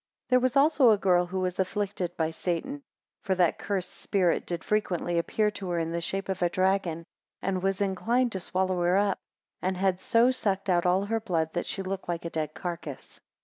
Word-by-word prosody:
THERE 255 0 +5
was 255 +1 0
also 280 -2 +5
a 215 - +5
girl, 180 -2 +3
who 185 +1 -2
was 185 0 -2
afflicted 190 -2 -2
by 160 -1 0
Satan, 175 - -3
2 - - -30 0.4
For 190 - 0
that 180 -2 +2
cursed 190 -3 -3
spirit 185 -4 0
did 170 -2 -3
frequently 175 -5 0
appear 210 +5 +1
to 195 -3 -6
her 175 - 0
in 165 0 -1
the 170 0 -2
shape 195 +3 -3
of 190 -1 -3
a 175 - +3
dragon, 185 -3 0 0.3
and 185 -1 -1
was 195 +1 0
inclined 230 +6 +1
to 190 - -3
swallow 185 0 -1
her 175 +2 +3
up, 200 -1 +1 0.4
and 185 0 -1
had 185 -1 +1
so 230 +5 +4
sucked 195 -6 -1
out 175 0 +2
all 185 +2 +3
her 225 +2 0
blood, 165 -7 -1
that 175 - -2
she 195 - -3
looked 190 -1 -5
like 170 0 -3
a 170 - -4
dead 155 -1 -3
carcass. 170 -6 -6
185 Hz, 215 wpm, -28 LUFS, 175-200 Hz, 0.4 s, THERE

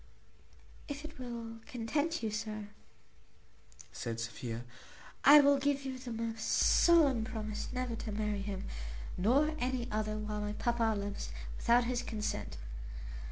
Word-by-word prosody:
"If 285 +1 -5
it 310 -3 -10
will 230 -2 -6
content 290 +7 -1
you, 220 - 0
sir," 215 -1 -4 1.2
said 115 -1 -4
Sophia, 115 0 -4 0.6
"I 295 +1 +10
will 280 0 +5
give 280 0 +1
you 260 -1 -4
the 250 -1 -6
most 225 -1 -3
solemn 295 -9 +5
promise 215 -2 -4
never 250 -2 -2
to 220 - -5
marry 210 -1 -1
him, 195 -1 -4 0.5
nor 275 +11 +3
any 250 -1 -1
other, 215 0 -1
while 210 0 -3
my 210 0 -2
papa 230 -1 +1
lives, 200 - -4 0.3
without 240 +1 +4
his 245 0 0
consent. 210 - -3
225 Hz, 135 wpm, -33 LUFS, 210-255 Hz, 1.2 s, I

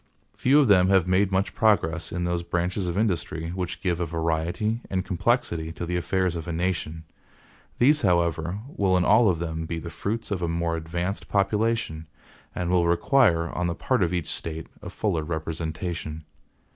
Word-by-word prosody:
Few 140 +4 +4
of 145 - +4
them 95 -3 +5
have 95 -3 +4
made 95 +2 +2
much 95 +1 0
progress 85 -7 +1
in 90 0 -2
those 85 0 0
branches 90 +2 -2
of 85 +1 -2
industry 85 -6 -1
which 90 -1 -4
give 90 -3 0
a 85 - 0
variety 85 +8 -1
and 95 0 -1
complexity 80 -3 0
to 85 - -5
the 90 +1 -2
affairs 90 0 0
of 80 -1 -5
a - - -2
nation. 85 -2 -2 0.7
These, 150 +5 +4
however, 85 0 +1
will 95 -2 +2
in 90 - +2
all 110 0 +5
of 90 - +1
them 80 -1 -4
be 85 - -3
the 85 +1 -6
fruits 105 +7 -3
of 95 -3 -1
a 85 - 0
more 85 0 -1
advanced 85 +4 -3
population, 105 -5 0 0.5
and 90 -1 -1
will 90 -2 +3
require, 85 -1 +3
on 90 0 -1
the 85 - -2
part 125 +6 0
of 90 -2 +2
each 90 -3 -2
State, 80 -1 -5 0.2
a - - -7
fuller 80 - -1
representation. 80 0 -4
85 Hz, 185 wpm, -25 LUFS, 85-95 Hz, 0.7 s, them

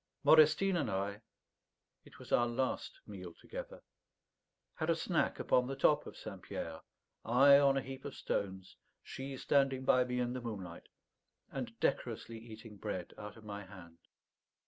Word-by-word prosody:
Modestine 160 +5 +6
and 140 -9 0
I 100 +2 -2 0.8
it - - -15
was - - -12
our 120 - +4
last 130 - -2
meal - - -9
together - - -8 0.9
had 160 -1 -3
a 165 - +4
snack 165 +1 0
upon 125 0 +3
the 135 - -3
top 145 +2 +3
of - - -10
St. - - -8
Pierre, 80 -1 -6 0.4
I 140 +4 +7
on 140 -1 +4
a 135 - 0
heap 135 0 -8
of - - -6
stones, 95 -1 -3 0.3
she 135 0 -6
standing 135 -1 +2
by 125 -1 +5
me 125 0 -2
in 125 0 0
the 130 - -4
moonlight 95 -8 -7 0.6
and - - -5
decorously 115 -1 -1
eating 110 -1 -11
bread 95 -4 -4
out 105 +1 -8
of 110 - -14
my 105 -1 -6
hand. 90 -4 -13
125 Hz, 160 wpm, -34 LUFS, 105-140 Hz, 0.9 s, I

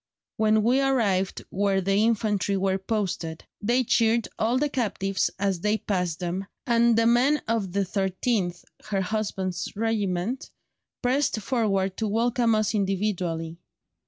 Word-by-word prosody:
When 215 0 +3
we 250 +4 +3
arrived 210 -9 +1
where 195 0 +1
the 195 +1 0
infantry 205 -2 +1
were 190 0 0
posted, 190 -6 -3 0.2
they 240 +5 +2
cheered 230 -2 +2
all 230 +3 +2
the 295 +3 +2
captives 200 -8 -1
as 195 -2 0
they 210 +4 +1
passed, 180 -6 -2
them, 180 +2 -3 0.2
and 235 -2 +3
the 230 - +4
men 250 +6 +3
of 220 -5 -1
the 200 - +1
13th" 190 -1 -1 0.2
(her 200 -2 -1
husband's 190 -2 -2
regiment) 215 +1 -1 0.5
"pressed 255 -1 +1
forward 195 -5 0
to 220 - -1
welcome 230 +1 +2
us 215 0 +1
individually. 185 -5 -1
210 Hz, 135 wpm, -26 LUFS, 190-230 Hz, 0.5 s, the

